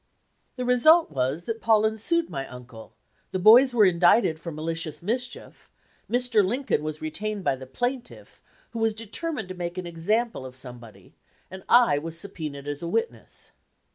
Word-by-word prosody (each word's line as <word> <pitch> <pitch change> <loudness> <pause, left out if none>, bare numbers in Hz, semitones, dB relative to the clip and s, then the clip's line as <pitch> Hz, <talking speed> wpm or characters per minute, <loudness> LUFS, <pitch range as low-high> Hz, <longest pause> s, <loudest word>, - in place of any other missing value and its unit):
"The 250 -1 -4
result 310 +7 +5
was 135 +4 -1
that 225 +2 -5
Paullin 220 -1 +2
sued 335 +9 +1
my 135 0 -5
uncle, 125 -3 -12 0.3
the 185 - -3
bovs 240 +6 +7
were 215 -3 +6
indicted 175 -1 +3
for 170 +1 -7
malicious 165 +1 -3
mischief, 245 +5 -5 0.4
Mr. 245 -3 +2
Lincoln 245 - -1
was 155 0 -5
retained 205 +6 -4
by 135 - +1
the 130 0 -11
plaintiff, 245 - -5 0.3
who 230 - -5
was 225 -1 +1
determined 225 - -5
to - - -5
make 175 0 -5
an 180 - -4
example 195 - -1
of 130 -1 -10
some 125 -2 -6
body, 115 -2 -16 0.4
and 190 0 -8
I 235 -12 +5
was 165 +2 -5
subpoenaed 150 -7 -6
as 145 0 -5
a 170 - -4
witness. 455 - -4
185 Hz, 170 wpm, -25 LUFS, 155-235 Hz, 0.4 s, bovs